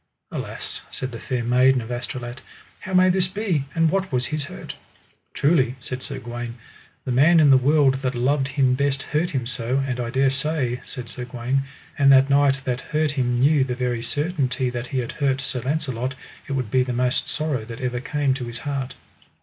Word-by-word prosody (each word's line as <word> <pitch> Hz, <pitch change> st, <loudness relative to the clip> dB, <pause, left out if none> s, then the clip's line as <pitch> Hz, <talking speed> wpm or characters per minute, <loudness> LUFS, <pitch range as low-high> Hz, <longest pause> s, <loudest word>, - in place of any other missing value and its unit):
Alas, -, -, -5 dB
said 130 Hz, -, -4 dB
the 115 Hz, -, -7 dB
Fair 125 Hz, 0 st, -2 dB
Maiden 125 Hz, +2 st, +4 dB
of 115 Hz, 0 st, -7 dB
Astolat, 120 Hz, 0 st, -5 dB, 0.4 s
how 190 Hz, -, -8 dB
may 185 Hz, 0 st, +6 dB
this 185 Hz, 0 st, +2 dB
be, 185 Hz, -7 st, -1 dB
and 165 Hz, -1 st, +3 dB
what 190 Hz, -2 st, -1 dB
was 125 Hz, -1 st, 0 dB
his 150 Hz, +3 st, -3 dB
hurt? -, -, -8 dB, 0.6 s
Truly, 135 Hz, -5 st, +3 dB
said 130 Hz, +1 st, -6 dB
Sir 140 Hz, 0 st, -5 dB
Gawaine, 120 Hz, -1 st, -6 dB, 0.5 s
the 130 Hz, -, -2 dB
man 155 Hz, +7 st, +5 dB
in 145 Hz, -3 st, +6 dB
the -, -, +8 dB
world 140 Hz, +1 st, +4 dB
that 130 Hz, -1 st, -1 dB
loved 135 Hz, +3 st, +1 dB
him 135 Hz, -2 st, +2 dB
best 140 Hz, +1 st, 0 dB
hurt 155 Hz, +4 st, 0 dB
him 135 Hz, -8 st, -2 dB
so; 125 Hz, +1 st, -1 dB
and 125 Hz, -2 st, -3 dB
I 120 Hz, -1 st, -2 dB
dare 135 Hz, +2 st, +2 dB
say, 135 Hz, -3 st, 0 dB
said 125 Hz, -2 st, -7 dB
Sir 125 Hz, +1 st, -6 dB
Gawaine, 125 Hz, +2 st, -1 dB, 0.3 s
an 140 Hz, -1 st, +6 dB
that 135 Hz, 0 st, +6 dB
knight 140 Hz, -1 st, +4 dB
that 125 Hz, -1 st, -2 dB
hurt 155 Hz, -1 st, 0 dB
him 125 Hz, -4 st, 0 dB
knew 140 Hz, +1 st, +4 dB
the 125 Hz, -2 st, -2 dB
very 125 Hz, -2 st, -1 dB
certainty 135 Hz, -1 st, -1 dB
that 120 Hz, 0 st, -4 dB
he 135 Hz, -, -3 dB
had 120 Hz, -2 st, -2 dB
hurt 135 Hz, -2 st, 0 dB
Sir 130 Hz, -2 st, -3 dB
Launcelot, 130 Hz, -2 st, -2 dB, 0.3 s
it 140 Hz, -, -3 dB
would 130 Hz, -6 st, -2 dB
be 130 Hz, -, +4 dB
the 125 Hz, -1 st, -1 dB
most 125 Hz, +1 st, 0 dB
sorrow 150 Hz, -7 st, -1 dB
that 115 Hz, +2 st, -8 dB
ever 125 Hz, -2 st, -2 dB
came 140 Hz, +2 st, 0 dB
to 130 Hz, -2 st, -4 dB
his 120 Hz, 0 st, -5 dB
heart. 135 Hz, -1 st, -4 dB
130 Hz, 205 wpm, -23 LUFS, 125-145 Hz, 0.6 s, the